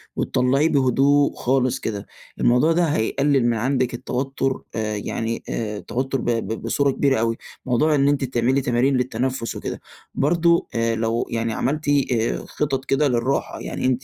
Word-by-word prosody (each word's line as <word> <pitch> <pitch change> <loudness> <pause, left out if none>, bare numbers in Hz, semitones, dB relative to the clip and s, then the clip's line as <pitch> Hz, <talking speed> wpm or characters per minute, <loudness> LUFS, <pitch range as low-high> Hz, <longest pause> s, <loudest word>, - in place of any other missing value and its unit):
وتطلعيه 135 +5 +2
بهدوء 140 +1 +3
خالص 130 0 +1
كده. 100 -3 -4 0.3
الموضوع 125 +7 +4
ده 175 +2 +3
هيقلل 140 -1 +1
من 120 - +2
عندِك 130 +1 0
التوتر، 135 +2 -2
آآ، 110 -1 -2
يعني 115 +2 -3
آآ 105 -2 -3
التوتر 130 +4 -3
ب - - -2
ب 115 -1 -2
بصورة 140 +5 +1
كبيرة 135 -2 +1
أوي، 115 0 0 0.3
موضوع 150 +5 +2
إن 140 0 +3
أنتِ 145 -1 +2
تعملي 130 +1 +1
تمارين 125 +2 +2
للتنفس 125 0 -2
وكده. - - -5 0.4
برضه، 170 +4 +2
آآ 115 0 +1
لو 115 +1 -1
يعني 115 -1 -1
عملتِ 150 +7 -1 0.6
خِطط 135 -3 -2
كده 140 +2 +2
للراحة، 125 +1 -1
يعني - - -4
أنتِ 130 0 +1
130 Hz, 155 wpm, -22 LUFS, 115-140 Hz, 0.6 s, الموضوع